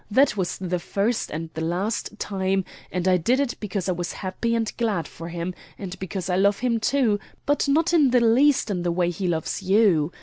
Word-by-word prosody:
That 265 +5 +4
was 185 -3 -2
the 180 -1 -2
first 210 +6 -1
and 160 +1 -5
the 160 - -4
last 195 +6 -2
time, 190 -2 -1 0.3
and 180 0 -1
I 185 -1 +5
did 240 +10 +2
it 280 -3 0
because 195 -3 -3
I - - +2
was 175 0 -3
happy 210 +5 -2
and 225 -1 -1
glad 210 -9 0
for 165 +1 -9
him; 170 +1 -4 0.2
and 190 -1 -7
because 190 -1 -4
I 180 -1 +1
love 200 +1 +3
him 235 -2 0
too, 230 -4 +2 0.3
but 290 0 +1
not 320 +5 +2
in 300 -6 +5
the 250 0 +4
least 240 +2 +4
in 180 -3 -1
the 175 0 0
way 175 0 +1
he 180 +2 -3
loves 165 +2 -1
you. 190 -5 +3
195 Hz, 215 wpm, -24 LUFS, 175-230 Hz, 0.3 s, I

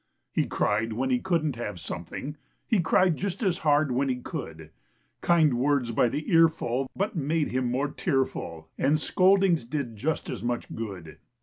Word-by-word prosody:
He - - 0
cried 110 +2 0
when 130 +4 -1
he 125 - +3
couldn't 155 -7 0
have 105 -6 -5
something; 85 - -6 0.3
He 220 - +2
cried 175 0 +3
just 195 +3 -3
as 185 -2 +1
hard 150 -3 +3
when 135 +2 +1
he 130 - +1
could; 80 - -7 0.5
Kind 160 -5 +4
words 130 -1 +1
by 115 +1 +3
the 145 +5 -4
earful 155 -6 +3
but 200 +2 -1
made 155 0 0
him 130 0 -1
more 135 +4 0
tearful, 130 - -2
And 145 +3 +3
scoldings 190 - +3
did 125 -2 -4
just 145 +9 -2
as 120 - -5
much 120 +1 -3
good. 95 -8 -7
140 Hz, 170 wpm, -27 LUFS, 120-165 Hz, 0.5 s, Kind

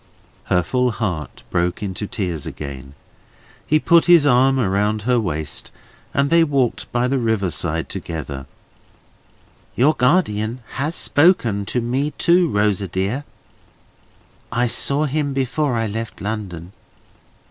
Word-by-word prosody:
Her 90 - +2
full 125 +3 +1
heart 95 - -4
broke 90 +3 0
into 100 +1 -4
tears 90 - -4
again. 70 -1 -8 0.7
He 155 - +4
put 170 +2 +4
his 170 -4 +7
arm 135 0 +4
about 105 -1 0
her 125 +1 +2
waist, 80 -8 -4 0.4
and 140 0 +1
they 170 0 +6
walked 140 -6 0
by 120 +1 +1
the 135 +1 0
river 110 -6 0
side 80 +1 -2
together. 70 -5 -6 1.3
"Your 140 +6 +4
guardian 125 - +1 0.2
has 150 +5 -1
spoken 120 - +2
to 125 - 0
me 130 +5 -1
too, 175 0 +4
Rosa 105 -3 +1
dear. 100 - -2 1.3
I 120 +1 +1
saw 140 +5 0
him 145 -1 -1
before 135 +1 0
I 115 -1 0
left 110 +1 -5
London." 95 -5 -5
115 Hz, 130 wpm, -20 LUFS, 95-135 Hz, 1.3 s, his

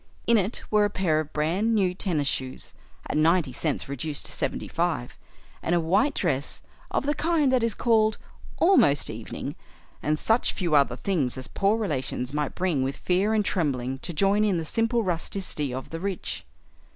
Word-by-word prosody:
In 235 - +4
it 205 +1 +1
were 210 -1 +4
a 205 - +2
pair 175 -6 +1
of 155 -1 -4
brand 180 +10 +1
new 190 -4 +2
tennis 170 -7 -1
shoes 130 -1 -3 0.3
(at - - -3
ninety 160 -2 +3
cents 150 +3 -1
reduced 140 +2 -3
to - - -1
seventy - - -2
five) - - -2 0.5
and 170 - +1
a - - +3
white 195 - +2
dress 145 -6 -1 0.3
of - - -1
the 295 - +2
kind 305 -2 +2
that 255 - +3
is 230 -2 0
called 220 -2 +3 0.4
"almost 150 - +4
evening," - - -6 0.5
and 155 +1 +1
such 225 +8 +2
few 175 -4 -2
other 140 -4 +4
things 140 -6 -1
as 130 - -5
poor 200 +3 +1
relations 135 - -2
might 150 -1 -2
bring 175 -7 0
with 135 +1 -2
fear 195 +5 +1
and 210 -2 +2
trembling 135 -8 -1
to 175 - -5
join 195 +6 +2
in 200 -4 +2
the 165 - -3
simple 230 +6 +1
rusticity 170 -5 -2
of 130 +1 -6
the 165 - -4
rich. 195 0 -4
175 Hz, 185 wpm, -26 LUFS, 145-210 Hz, 0.5 s, In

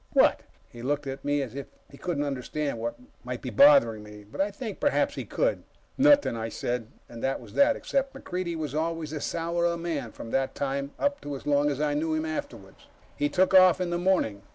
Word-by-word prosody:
"What?" - - +5 0.3
He 120 - -12
looked 145 +3 -1
at 135 0 -6
me 145 0 +1
as 125 - -7
if 140 0 -6 0.2
he - - -12
couldn't 155 -1 -2
understand 140 -1 -3
what 115 +1 -3 0.3
might - - -6
be - - -4
bothering 280 - +6
me, 105 0 -12
but 105 - -5
I 200 - +1
think 210 0 -7
perhaps 290 - +2
he - - -5
could. - - 0 0.3
"Nothing," 285 - +5
I 115 0 -3
said, 120 0 -3 0.2
and 115 -1 -10
that 135 0 0
was - - -13
that, 285 0 +4
except 275 0 -2
MacReidie 180 -9 -4
was 155 -2 -4
always 160 0 -2
a 150 - -4
sourer 170 +1 -1
man 160 -8 -3
from 115 - -9
that 135 0 0
time 140 0 -2
up 285 0 0
to 145 -1 -5
as 135 - -9
long 145 0 +3
as 140 -1 -2
I 150 -1 +1
knew 155 +2 0
him 155 0 -1
afterwards. 155 0 -7 0.3
We 145 - +2
took 185 +4 +2
off 185 -2 +7
in 180 -1 -1
the 175 - 0
morning. 175 - +1
150 Hz, 220 wpm, -27 LUFS, 135-180 Hz, 0.3 s, off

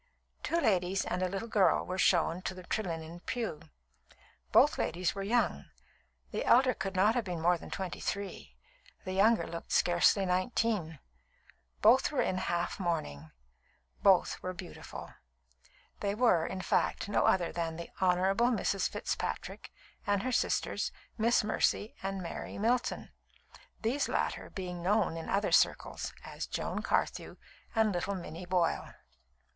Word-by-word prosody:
Two 335 - 0
ladies 190 - +1
and 180 - -2
a 185 - +1
little 195 +4 -4
girl 200 -6 +3
were 185 +1 -4
shown 175 -1 +3
to 185 - -4
the 185 - -9
Trelinnen 170 -4 -4
pew. 225 -11 -3 0.9
Both - - +5
ladies 180 +1 0
were 195 - -5
young; 205 - +1 0.7
the - - -2
elder 255 +1 +5
could 195 -2 -4
not 205 +4 +4
have 245 -1 0
been 180 -4 -4
more 175 +2 +3
than 170 - -9
twenty 190 -2 -4
three, 185 - -5 0.5
the 185 - -3
younger 220 +4 +4
looked 170 0 -7
scarcely 175 +3 +4
nineteen. 185 -2 0 0.9
Both 250 +7 +6
were 285 - +1
in 185 - -1
half 175 +1 -2
mourning; 115 - -3 0.7
both 190 -3 +4
were 185 - -4
beautiful. 180 -1 -9 0.9
They 200 0 -1
were, 210 -9 +3
in 190 - -4
fact, - - 0
no 205 - +2
other 180 -3 +2
than 165 -1 -3
the 170 +1 -8
Honourable 190 +5 +3
Mrs. 205 -5 0
Fitzpatrick, - - -4 0.4
and 205 0 +1
her 255 - -1
sisters, - - 0 0.2
Miss 230 +1 +3
Mercy 215 0 0
and 195 -1 -3
Mary 170 - -6
Milton, 240 +4 0 0.7
these 250 +6 0
latter - - -1
being 180 -3 -6
known 200 -1 +2
in 165 - -6
other 200 +1 +1
circles - - +2
as - - -6
Joan - - -3
Carthew - - -1 0.4
and 220 -1 +3
little 190 +3 -2
Minnie 175 -1 -7
Boyle. 180 -2 0
190 Hz, 145 wpm, -31 LUFS, 175-215 Hz, 0.9 s, Both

